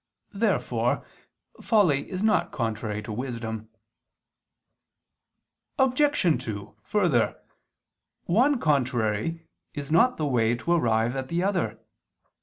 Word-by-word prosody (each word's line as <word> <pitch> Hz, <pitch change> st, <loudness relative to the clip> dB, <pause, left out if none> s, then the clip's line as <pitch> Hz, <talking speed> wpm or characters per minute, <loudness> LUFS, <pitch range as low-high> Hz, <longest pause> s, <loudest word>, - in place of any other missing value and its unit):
Therefore 215 Hz, +3 st, 0 dB, 0.6 s
folly 180 Hz, -, +2 dB
is 185 Hz, +1 st, -3 dB
not 215 Hz, -1 st, +2 dB
contrary 110 Hz, -2 st, -3 dB
to 110 Hz, -, -6 dB
wisdom. 110 Hz, -2 st, -5 dB, 2.1 s
Obj. 265 Hz, -, +2 dB
2: 105 Hz, -2 st, -6 dB
Further, 165 Hz, -, +1 dB, 0.9 s
one 250 Hz, +9 st, +3 dB
contrary 130 Hz, -, 0 dB, 0.3 s
is 145 Hz, 0 st, -5 dB
not 240 Hz, +10 st, +4 dB
the 155 Hz, -, -1 dB
way 120 Hz, -4 st, +2 dB
to 130 Hz, +8 st, -3 dB
arrive 120 Hz, -6 st, +2 dB
at 130 Hz, -1 st, -3 dB
the 170 Hz, +4 st, -1 dB
other. 180 Hz, -, 0 dB
140 Hz, 100 wpm, -26 LUFS, -, 2.1 s, not